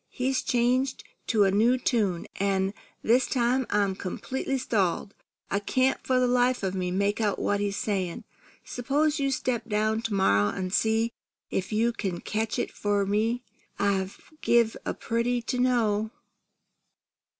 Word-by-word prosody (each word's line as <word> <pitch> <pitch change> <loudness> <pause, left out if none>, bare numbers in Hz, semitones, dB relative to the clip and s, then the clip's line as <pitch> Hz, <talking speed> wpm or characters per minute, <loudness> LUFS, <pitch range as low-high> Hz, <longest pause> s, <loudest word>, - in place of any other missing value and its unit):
He's 260 +1 -1
changed 250 +2 +1 0.2
to 215 -3 +4
a 195 - +3
new 230 +6 +4
tune, 210 -9 0
an' 195 0 +1 0.3
this 245 +4 +3
time 250 0 +1
I'm 200 -2 +2
completely 265 +8 -3
stalled. 200 -5 0 0.4
I 200 - +2
can't 255 +6 +1
for 255 -1 +2
the 250 - +3
life 245 -1 +2
of 190 -1 -1
me 185 -1 -2
make 200 +4 0
out 210 -2 +1
what 205 - 0
he's 200 -1 -1
saying. 190 -5 -2 0.4
S'pose 290 +5 0
you 275 -1 +1
step 240 -3 -2
down 215 +1 +1
to 225 -3 -2
morrow 105 - +3
an' 185 - -4
see 220 +3 +2 0.4
if 190 +2 -2
you 230 +2 +2
can 190 -6 -3
catch 220 +1 -2
it - - -2
for 205 -1 0
me. 225 +5 0 0.3
I'd 190 -2 +1 0.3
give 235 -2 +3
a - - -1
pretty 235 +2 0
to 250 +2 -2
know!" 220 -4 +2
220 Hz, 155 wpm, -27 LUFS, 200-245 Hz, 0.4 s, to